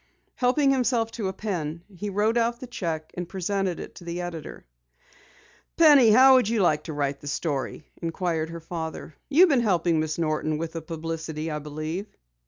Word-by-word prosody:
Helping 275 +3 +2
himself 245 -3 +1
to 215 -5 -3
a - - -1
pen, 170 -6 -4
he 205 +3 -4
wrote 210 +3 +1
out 235 0 +1
the 255 - -7
cheque 165 -10 -4
and 175 -1 -5
presented 190 -1 -2
it - - -8
to - - -12
the 170 +1 -4
editor. 175 -3 -7 1.1
"Penny, 290 -8 +7
how 260 +5 +8
would 255 -5 +4
you 230 -1 +1
like 155 -3 +2
to 160 - -5
write 140 -1 -2
the 145 - -9
story?" 145 0 -3 0.2
inquired 165 -1 -2
her 170 0 -7
father. 160 -1 -6 0.2
"You've 335 +6 +6
been 270 -5 +3
helping 175 -6 +2
Miss 155 0 -2
Norton 155 -1 0
with 165 +1 -4
the 165 - -5
publicity, 160 -1 -5
I 150 - -2
believe." 155 +6 -5
170 Hz, 185 wpm, -26 LUFS, 160-225 Hz, 1.1 s, how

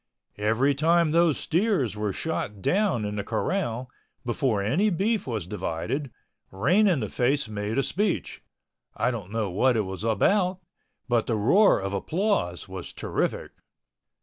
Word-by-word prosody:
Every 115 +7 +2
time 165 +3 +3
those 165 -2 +3
steers 165 - 0
were 105 -1 -1
shot 105 - -3
down 180 - +1
in 105 0 -4
the 100 - -2
corral, 125 - -2 0.4
before 120 -2 0
any 170 - +2
beef 200 +1 0
was 110 -8 -3
divided, 105 - -3 0.4
Rain 175 - +3
in 170 -9 +2
the 105 - -2
Face 130 +5 0
made 105 +2 -3
a 135 - +3
speech—I 180 - -3
don't 105 -6 -6
know 105 -3 -2
what 120 +6 +2
it - - +3
was 95 0 -5
about, 180 - +2 0.5
but 120 -3 +1
the 115 - +1
roar 180 - +4
of 95 0 -4
applause 160 - -1
was 95 -2 -7
terrific. - - -2
125 Hz, 150 wpm, -26 LUFS, 105-170 Hz, 0.5 s, roar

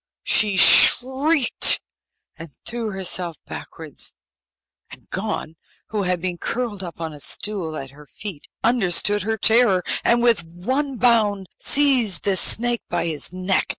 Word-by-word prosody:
She 210 -3 +2
shrieked 265 - +5 0.6
and 165 - -11 0.2
threw 235 -2 -4
herself 185 -3 -2
backwards, 160 -3 -7 0.8
and - - -14
Gon, 190 -5 -5 0.3
who 215 -2 -3
had 180 -2 -2
been 175 0 -5
curled 230 -5 -4
up 170 -2 -9
on 160 -2 -6
a 150 - -12
stool 175 -1 -1
at 135 -1 -8
her 145 +1 -17
feet, 195 -5 -9 0.2
understood 205 -3 +1
her 220 +3 -2
terror, 220 -4 +2 0.2
and 235 0 +2
with 230 -7 +2
one 255 - -4
bound 215 -6 +1
seized 255 -10 +3
the 200 -1 +1
snake 240 +4 +2
by 175 -1 -2
his 160 -2 -1
neck. 185 +1 -1
200 Hz, 140 wpm, -20 LUFS, 175-235 Hz, 0.8 s, shrieked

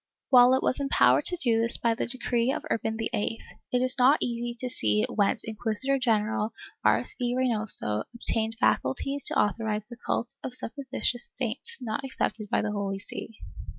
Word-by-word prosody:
While 250 0 +7
it 260 - -1
was - - 0
empowered 275 -1 +3
to 360 - +3
do 235 -8 +1
this 230 +1 +4
by 230 -1 +1
the 225 - -3
decree 245 0 -1
of 310 - -4
Urban 220 0 -1
VIII, 225 0 -2 0.3
it 250 0 +1
is 255 +1 0
not 265 +4 +5
easy 240 0 -3
to 255 - -3
see 105 - +1
whence 200 -2 0
Inquisitor 225 +4 -2
general 220 -2 0 0.3
Arce - - +2
y 245 0 0
Reynoso 215 - +4
obtained 225 -1 +1
faculties 275 - 0
to - - +1
authorize 210 0 -1
the 240 +1 -12
cult 240 +1 -2
of 255 - -4
supposititious 260 -1 -3
saints 470 0 -3
not 240 +3 -4
accepted 230 -5 -3
by - - +1
the 215 - -2
Holy 200 -1 -3
See. 210 +2 -8
235 Hz, 175 wpm, -27 LUFS, 215-255 Hz, 0.3 s, While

